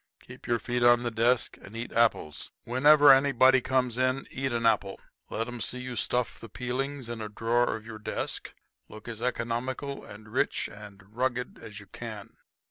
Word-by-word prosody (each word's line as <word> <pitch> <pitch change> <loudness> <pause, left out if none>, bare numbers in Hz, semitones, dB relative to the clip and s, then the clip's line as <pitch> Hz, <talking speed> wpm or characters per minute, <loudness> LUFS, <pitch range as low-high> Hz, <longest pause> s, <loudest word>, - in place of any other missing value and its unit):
Keep - - -13
your 120 - +2
feet 120 +2 -2
on 120 0 +6
the 120 - -1
desk 115 +2 +1
and 110 +3 -10
eat 115 - -5
apples. 115 -10 +1
Whenever 145 +3 +7
anybody 130 -1 +5
comes 125 -1 0
in 130 +1 +1
eat 135 0 -2
an 115 -1 -1
apple. 100 -3 +2 0.3
Let 115 +2 -2
'em 120 -1 -6
see 125 - -3
you 125 -1 -6
stuff 125 0 -1
the 115 - -10
peelings 130 +3 -3
in 115 -1 -5
a 105 - -5
drawer 115 +3 +1
of 110 -1 -9
your 110 -1 -8
desk. 105 - -4 0.3
Look 110 +1 -12
as 115 -1 -6
economical 125 +3 -2
and 105 +1 -12
rich - - 0
and 100 -2 -12
rugged 125 0 -2
as 105 0 -9
you 105 - -12
can." 110 0 -8
120 Hz, 185 wpm, -28 LUFS, 110-130 Hz, 0.3 s, Whenever